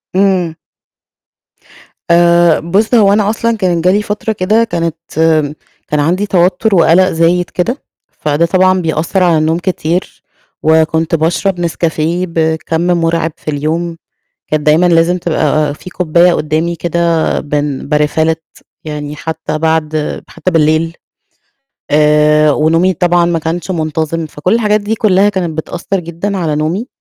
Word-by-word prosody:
امم. 185 -4 +1 1.6
آآ، 170 -1 +4
بُص 195 +8 0
هو 200 -3 +5
أنا 210 -1 +2
أصلًا 230 +1 -1
كان 180 -4 0
جه 180 +2 +3
لي 205 - +2
فترة 210 +1 -3
كده 215 +4 +1
كانت 165 -7 -2 0.9
كان 150 - -1
عَندي 180 +7 +1
توتر 190 +2 +1
وقلق 175 +3 +4
زايد 170 +2 +1
كده، 235 +10 -2 0.3
فده 150 +2 0
طبعًا 185 +1 +2
بيأثّر 165 +3 0
على 170 -3 +3
النوم 160 +2 +1
كتير، 175 -1 -3 0.4
وكنت 160 +1 +2
باشرب 175 +3 0
نسكافيه 170 +1 -1
بكَّم 160 0 -1
مرعب 165 -2 0
في 155 - -5
اليوم، 165 +4 -2 0.5
كانت 155 -1 -1
دايمًا 160 +4 +4
لازم 170 +1 +2
تبقى 155 -3 0
في 180 +4 -11
كوباية 175 0 +2
قدّامي 160 +2 -1
كده 170 0 0
بن 145 -2 -3
باRefill 150 +2 +1
it 160 0 -8 0.2
يعني 150 -1 -6
حتى 160 -1 -4
بعد 155 -1 -1
حتى 185 - -3
بالليل. 165 0 +1 1.0
آآ 150 0 +4
ونومي 165 +5 +2
طبعًا 175 +1 +2
ما 170 -1 0
كانش 165 +4 -3
منتظم، 160 -1 -2
فكُلّ 155 +5 -2
الحاجات 210 -2 +1
دي 210 +2 -2
كُلّها 205 -2 +3
كانت 175 -6 -3
بتأثّر 175 +4 -3
جدًا 175 +4 -4
على 160 -4 -1
نومي. 165 +10 -2
170 Hz, 140 wpm, -13 LUFS, 155-185 Hz, 1.6 s, هو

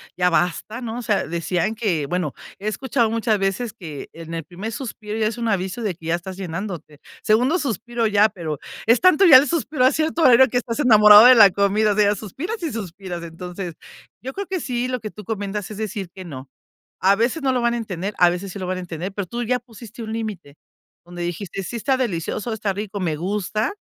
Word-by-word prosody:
ya 180 0 +2
basta 180 +6 -1
¿no? 235 0 -4
O - - -4
sea, 210 -4 0
decían 170 +5 -1
que, 195 -10 -1
bueno, 180 +4 -2 0.3
he 205 - -5
escuchado 235 +2 0
muchas 225 -1 0
veces 195 +4 -1
que 160 -10 -9
en 165 0 -9
el 165 - -4
primer 185 +8 -7
suspiro 215 -3 -6
ya 220 - +1
es 220 +2 -4
un 235 - -1
aviso 195 +1 -1
de 205 -5 -2
que 160 -1 -16
ya 165 - +2
estás 185 +2 -7
llenándote. 175 -4 -6 0.2
Segundo 250 +10 +3
suspiro 240 - -2
ya, 210 0 +4
pero 160 -7 -5 0.3
es 230 +2 +4
tanto 370 +1 +6
ya 295 -8 +10
el 280 - +3
suspiro 300 -4 0
a 260 - +6
cierto 320 +1 -1
horario 260 -3 +7
que 245 - 0
estás 240 0 -3
enamorado 210 -4 +8
de 255 +1 +9
la 210 -4 +9
comida, 205 +2 +2
o - - -5
sea, 205 0 +4
suspiras 330 - -6
y 325 - -2
suspiras. 185 -4 -6
Entonces, 175 +1 -7 0.5
yo 265 +2 -6
creo 400 - -4
que 375 0 -3
sí, 250 -4 -2
lo 250 -1 -2
que 215 - -6
tú 210 - -11
comentas 205 -1 -4
es 210 - -7
decir 205 -3 -4
que 190 -1 -9
no, 135 -5 -9 0.5
a 195 +2 +5
veces 235 +10 0
no 265 -1 +2
lo 250 - 0
van 235 0 +1
a - - -1
entender, 200 -3 -4
a 175 -1 +6
veces 180 +2 -5
sí - - -7
lo 185 - -4
van 185 +1 -2
a - - -4
entender, 180 +2 -6
pero 200 -1 -4
tú 240 +6 -4
ya 250 +2 0
pusiste 235 -1 -12
un 220 0 -5
límite 205 -10 -5 0.5
donde 175 0 -8
dijiste: 175 +2 -4
"Sí, 235 - -6
está 260 +4 +1
delicioso, 220 -1 -2
está 210 -2 -2
rico, 205 +1 -5
me 165 -4 -1
gusta, 205 - -2
210 Hz, 230 wpm, -22 LUFS, 180-235 Hz, 0.5 s, ya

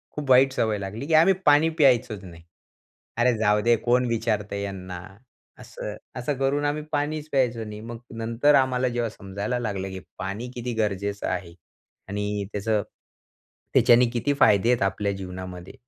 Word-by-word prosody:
खूप 145 -2 -5
वाईट 130 +1 +6
सवय 110 -4 0
लागली, 100 +6 -5
की 165 - -1
आम्ही 165 +5 +6
पाणी 150 +2 +5
प्यायचंच 120 -7 +3
नाही. 85 -3 -12 0.7
अरे, 120 +1 +3
जाऊदे, 105 +2 +3
कोण 125 +3 +2
विचारत 110 -3 -1
यांना, 95 -3 -5 0.6
असं 105 - -7 0.2
असं 125 +3 -2
करून 140 +2 0
आम्ही 150 +1 -1
पाणीच 150 +1 -2
प्यायचो 125 -4 +1
नाही. 105 -1 -8
मग 115 +1 -7 0.2
नंतर 115 +6 +2
आम्हाला 130 -1 +2
जेव्हा 120 -1 -1
समजायला 105 +4 -4
लागलं, 100 -5 -3
की 95 0 -6 0.2
पाणी 100 +7 -5
किती 120 0 -4
गरजेचं 100 -2 -2
आहे 85 -4 -3 0.6
आणि 105 0 -2
त्याचं, 105 +1 0 0.9
त्याच्याने 125 -1 +6
किती 135 +4 0
फायदे 105 -1 +5
आहेत 125 -1 +2
आपल्या 100 +1 0
जीवनामध्ये. 90 -1 -8
115 Hz, 150 wpm, -25 LUFS, 100-125 Hz, 0.9 s, वाईट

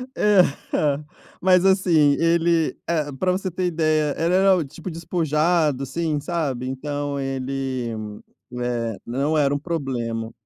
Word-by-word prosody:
Eh, 210 -3 +5 0.3
ah. 145 0 +1 0.4
Mas, 185 0 +4
assim, 170 -7 +4
ele, 165 -1 +2
eh, 155 -3 0
para 185 -1 +2
você 185 +1 -2
ter 180 +1 -2
ideia, 155 -3 +1
era 185 +3 +4
o 175 - 0
tipo 165 +6 -8
despojado, 160 -3 0
assim, 150 +2 -2
sabe, 145 -5 -2
então 145 +1 -3
ele, 135 -2 -3 0.7
eh, 115 -3 -2
não 140 +6 0
era 145 -1 +2
um 145 - -1
problema. 120 -8 -3
150 Hz, 130 wpm, -23 LUFS, 135-170 Hz, 0.7 s, Eh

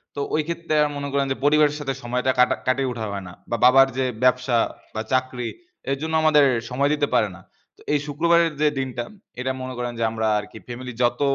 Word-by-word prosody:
তো - - -4 0.2
ওই 155 - +2
ক্ষেত্রে 170 -2 -3
আ - - +3
মনে 140 0 -4
করেন 140 -1 +2
যে - - +1
পরিবারের 150 0 +4
সাথে 135 -2 -2
সময়টা 125 +2 0
কাটা 125 - +5
কাটিয়ে 130 0 +1
ওঠা 115 -2 -4
হয় 100 -1 -5
না। 90 - -10 0.2
বা 120 - 0
বাবার 135 +1 +7
যে 130 - +1 0.2
ব্যবসা 125 -1 +3 0.4
বা 110 - -1
চাকরি 130 -2 0 0.4
এর 135 - 0
জন্য 160 0 -3
আমাদের 150 -2 +6 0.2
সময় 140 +3 +1
দিতে 145 -1 +1
পারে 105 - +3
না। 95 - -14 0.4
তো - - -21
এই 145 - +3
শুক্রবারের 170 +2 +2
যে 150 - +5
দিনটা, 125 -2 -3 0.4
এটা 130 +1 -1
মনে 130 0 -5
করেন 120 0 -2
যে 115 - 0
আমরা 110 0 -1
আরকি 105 +1 -9
ফ্যামিলি 125 0 -7
যত, 120 +2 +1
130 Hz, 215 wpm, -23 LUFS, 120-145 Hz, 0.4 s, বাবার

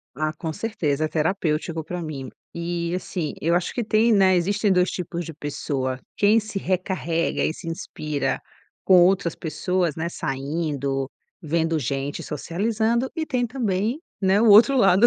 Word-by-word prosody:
Ah, 155 +1 0
com 160 0 -4
certeza, 160 -8 -1
é - - -4
terapêutico 160 0 -1
pra 175 +2 -5
mim. 140 -4 -5 0.3
E, 170 0 -2
assim, 180 -3 -3
eu 170 +2 +2
acho 175 0 0
que 240 - -1
tem, 220 +2 +3
né, 190 -3 +5
existem 200 +4 +1
dois 180 0 +3
tipos 175 -2 -4
de 165 - -7
pessoa, 140 -3 -3 0.2
quem 210 +2 +5
se 215 -2 -3
recarrega 180 -3 -1
e 155 - 0
se 170 - -10
inspira 155 -3 -2 0.5
com 185 -2 +7
outras 180 -1 +3
pessoas, 175 0 -1
né, 165 +1 -2
saindo, 140 -2 -2 0.3
vendo 165 0 0
gente, 140 +1 -3
socializando, 220 - -1
e 320 - 0
tem 250 -5 0
também, 225 - -1 0.2
né, 190 0 +3
o 225 +1 +4
outro 235 +7 +8
lado, 195 -2 +6
175 Hz, 160 wpm, -24 LUFS, 155-200 Hz, 0.5 s, outro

